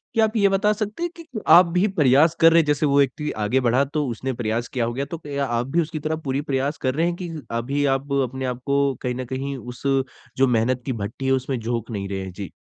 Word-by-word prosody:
क्या 225 -1 +5
आप 220 +1 -4
ये 200 -1 +4
बता 200 +2 +2
सकते 215 +8 -4
हैं 345 - -2
कि 335 -1 -11 0.2
आप 175 +3 +8
भी 195 +4 +4
प्रयास 155 -2 +4
कर 165 0 +7
रहे 165 - +6
हैं - - -4
जैसे 150 0 +1
वो 140 -1 +2
व्यक्ति 140 +2 +1
आगे 125 +6 +2
बढ़ा 125 +3 +3
तो 145 +1 -2
उसने 130 +2 -3
प्रयास 115 0 -2
किया 120 -3 -1
होगा 125 +4 -2
तो - - -6 0.3
आप 120 -1 -1
भी 170 +5 +1
उसकी 155 -1 -4
तरह 155 +2 -2
पूरी 135 +1 -1
प्रयास 140 0 -1
कर 130 -1 0
रहे 165 +3 +2
हैं 175 - -1
की 175 - -4 0.2
अभी 135 +5 -1
आप 140 +1 -6
अपने 130 +1 -4
आपको 140 +2 0
कहीं 125 -1 -2
न 130 +1 -4
कहीं 135 +2 -4
उस 125 -1 -9 0.6
जो 135 0 +4
मेहनत 120 +1 +1
की 130 - -1
भट्टी 110 +6 -5
है 135 - +2
उसमें 130 -1 0
झोंक 115 0 -3
नहीं 100 -3 -4
रहे 95 - -3
हैं? 95 - -6
जी। 100 -1 -7
135 Hz, 250 wpm, -23 LUFS, 125-155 Hz, 0.6 s, आप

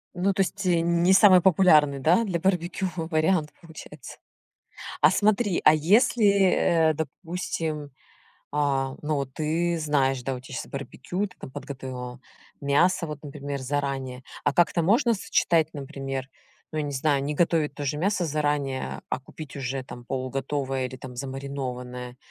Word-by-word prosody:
Ну, 190 +3 +1
то 195 - +1
есть, 195 +1 -2
э, 175 -2 +3
н 170 0 +1
не 185 +2 +5
самый 190 -2 +7
популярный, 155 -6 +5
да, 170 - +3
для 185 -5 -2
барбекю 185 +1 0
вариант, 160 -1 0
получается. 155 -4 -11 0.8
А - - +7
смотри, 205 -2 +2
а 155 - +7
если, 210 - +3 0.3
э, 165 -2 +3
допустим, 160 -1 -4 0.6
а, 135 -2 0
ну, 150 +1 -1
вот, 135 -2 -3
ты 165 +2 0
знаешь, 135 -4 +1
да, 135 +1 -2
у 125 - -7
тебя 130 - -10
щас - - -5
барбекю, 175 +8 -4
ты 180 - -16
там - - -9
подготовила 130 -2 -7 0.4
мясо, 160 +5 +2
вот, 150 -1 -7
например, 140 -1 -6
заранее. 135 -2 -3 0.2
А 145 - +2
как-то 170 +1 +3
можно 230 - +3
сочетать, 165 -5 +2
например, 135 -2 -5 0.4
ну, 155 - -3
я 150 - 0
не 145 - -4
знаю, 140 0 +1
не 150 +2 -2
готовить 160 -2 +1
тоже 145 0 -3
мясо 185 +3 0
заранее, 145 -3 -2
а - - -2
купить 145 +1 -10
уже 135 0 -3
там 120 -2 -10
полуготовое 135 +1 -2
или 130 +1 -8
там 130 -1 -9
замаринованное? 125 -2 -5
150 Hz, 155 wpm, -26 LUFS, 135-170 Hz, 0.8 s, самый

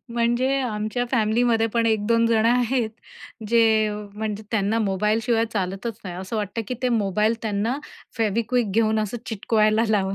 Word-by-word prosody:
म्हणजे 240 +2 +1
आमच्या 220 0 -2
फॅमिलीमध्ये 225 -1 +2
पण 230 -1 +2
एक-दोन 225 +1 +2
जण 225 -1 +2
आहेत, 245 -1 +1 0.6
जे 220 -2 +4 0.3
म्हणजे 215 0 -4
त्यांना 220 0 +1
मोबाईलशिवाय 215 +3 +1
चालतच 195 +2 -3
नाही. 180 - -6
असं 190 +4 -5
वाटतं 210 +2 -3
की 250 - -2
ते 250 - +2
मोबाईल 215 0 +1
त्यांना 220 +4 -1 0.4
Feviquick 225 +1 0
घेऊन 220 +1 +2
असं 215 +2 -2
चिटकवायला 215 0 +2
लावून 195 -2 +1
220 Hz, 140 wpm, -23 LUFS, 210-235 Hz, 0.6 s, जे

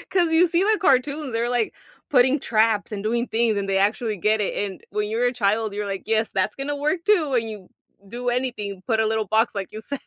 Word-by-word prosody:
'cause 350 -3 +2
you 335 +2 +5
see 345 +2 +1
the 430 +1 +2
cartoons, 280 -2 +1
they're, 230 +1 -1
like, 240 -3 0 0.4
putting 260 +1 +4
traps 220 -3 +1
and 200 - -4
doing 235 +3 0
things, 225 -2 +1
and 200 -1 -2
they 195 0 +2
actually 215 +2 0
get 215 +3 +1
it, 205 - -1 0.2
and 190 - -12
when 210 +1 -2
you're 230 +3 0
a 245 - +1
child, 215 -2 0
you're 210 0 -3
like, 195 -1 -4
"Yes, 220 0 +1
that's 190 -1 -1
gonna 275 +2 -3
work 305 +5 -1
too." 335 -10 +2
And 225 -2 0
you 205 -4 -10 0.4
do 245 +4 -5
anything, 235 -6 -3
put 225 -3 +1
a 220 - +2
little 220 -1 0
box 220 +4 +1
like 195 -2 -5
you 215 - -7
said. 280 +5 -4
225 Hz, 240 wpm, -23 LUFS, 210-260 Hz, 0.4 s, you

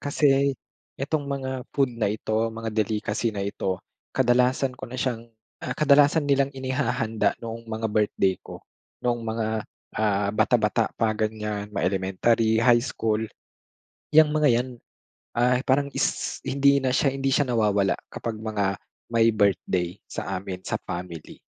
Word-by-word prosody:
Kasi 140 -1 +2 0.4
itong 140 +1 -2
mga 130 -2 -4
food 135 -3 +2
na 110 - +2
ito, 110 +2 -1
mga 115 0 -5
delicacy 110 +1 0
na 100 -1 -2
ito, 95 -2 -3 0.3
kadalasan 125 +2 +3
ko - - -7
na 125 - -7
siyang, 120 -3 -2 0.3
ah, - - -4
kadalasan 145 +1 +5
nilang 140 -1 +2
inihahanda 130 -4 0
noong 115 0 -7
mga 110 0 -2
birthday 100 -3 +2
ko. - - -11 0.4
Noong 120 -1 +1
mga, 110 -1 -2 0.5
ah, 100 -2 +1
bata, 105 - +3
bata - - +1
pa 110 -1 +2
ganiyan. 105 -1 -3
Ma 105 - -2
elementary, 100 +5 +2
high 120 +1 +5
school. 110 -3 -1 0.9
'Yang 155 0 +7
mga 150 -1 +4
'yan, 120 +2 +1 0.7
ay 125 +2 +2
parang 140 +2 +2
s - - -1
hindi 140 0 +3
na 130 -1 +1
siya 140 - +3
hindi 135 0 0
siya 145 - +4
nawawala 105 -4 +2 0.2
kapag 115 -2 -4
mga 105 -3 -1 0.3
may 115 0 +4
birthday 95 -3 +1
sa - - -4
amin 95 -1 -6
sa - - -2
family. 85 -3 -7
115 Hz, 150 wpm, -25 LUFS, 105-130 Hz, 0.9 s, Yang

